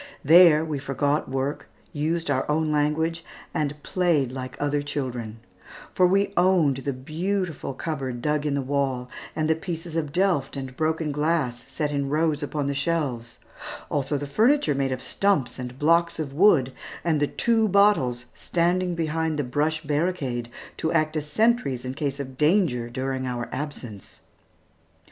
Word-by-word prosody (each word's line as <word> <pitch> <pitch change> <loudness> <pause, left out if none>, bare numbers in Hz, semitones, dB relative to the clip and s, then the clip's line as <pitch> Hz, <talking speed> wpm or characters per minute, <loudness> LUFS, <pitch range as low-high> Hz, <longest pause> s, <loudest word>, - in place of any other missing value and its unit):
There 160 0 +7
we 150 -3 -3
forgot 140 +2 -1
work, 135 +2 -3 0.2
used 160 +1 -1
our 130 +1 0
own 155 +1 +1
language, 160 +3 0 0.3
and 150 -1 -1
played 170 -8 +1
we - - -10
were 130 - -5
like 130 - -8
other 145 0 0
children; 125 -6 -4 0.5
for 185 - +4
we 195 +2 +2
owned 175 -7 +3
the 135 +1 -2
beautiful 160 +3 -3
cupboard 135 -6 -4
dug 150 +3 0
in 145 -2 0
the 140 - -1
wall, 130 -2 -1 0.2
and 155 -1 0
the 160 - +4
pieces 165 -1 -6
of 155 -3 -1
Delft 175 -6 +1
and 130 -1 -6
broken 160 +1 0
glass 145 -5 0
set 150 -2 -2
in 140 -1 -1
rows 155 0 +1
upon 145 0 -2
the 140 - 0
shelves, 140 -6 -2 0.5
also 145 0 0
the 145 - -4
furniture, 220 - +3
made 135 -1 0
of 130 0 -3
stumps 195 -12 0
and 125 0 -6
blocks 170 +3 +3
of 150 -4 -4
wood, 145 -7 +4 0.3
and 160 -3 +1
the 145 - +2
two 225 +3 +2
bottles 190 -12 +3
standing 175 +1 0
behind 160 -1 -1
the 145 - 0
brush 150 +5 -1
barricade 145 -6 -1 0.3
to 160 - -1
act 155 -1 +1
as 150 -1 -2
sentries 180 - +1
in 130 - -3
case 140 0 -3
of 130 -2 -7
danger 150 - +2
during 130 +1 -3
our 120 -1 -3
absence. 130 -8 -7
150 Hz, 165 wpm, -25 LUFS, 135-165 Hz, 0.5 s, There